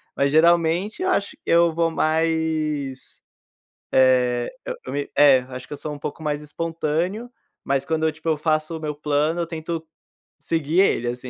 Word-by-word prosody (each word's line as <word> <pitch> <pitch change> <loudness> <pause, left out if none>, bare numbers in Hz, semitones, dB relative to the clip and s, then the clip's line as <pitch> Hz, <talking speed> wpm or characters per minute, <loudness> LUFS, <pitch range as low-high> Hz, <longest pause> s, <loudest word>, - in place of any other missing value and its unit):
Mas 140 0 +1
geralmente, 170 - +3
eu 375 - +1
acho 200 - 0
que - - -17
eu 170 0 +4
vou 165 0 +1
mais, 155 -4 -1 0.7
eh, 125 -2 +3
eu - - -4
eu - - -5
me 145 0 -3
é, 140 -3 +7
acho 125 0 -8
que - - -14
eu - - -6
sou 150 +1 -6
um 145 - -7
pouco 145 +2 -6
mais 150 -1 -2
espontâneo, 165 +7 -2 0.4
mas 135 0 0
quando 160 +2 0
eu, 160 - +1
tipo, 155 +2 -7
eu 155 -2 +1
faço 155 +1 0
o - - -8
meu 150 -1 -3
plano, 150 +3 0
eu 170 - -1
tento 165 0 -5 0.5
seguir 160 +1 0
ele 120 -10 +2
assim, 125 +1 -5
155 Hz, 185 wpm, -23 LUFS, 145-165 Hz, 0.7 s, é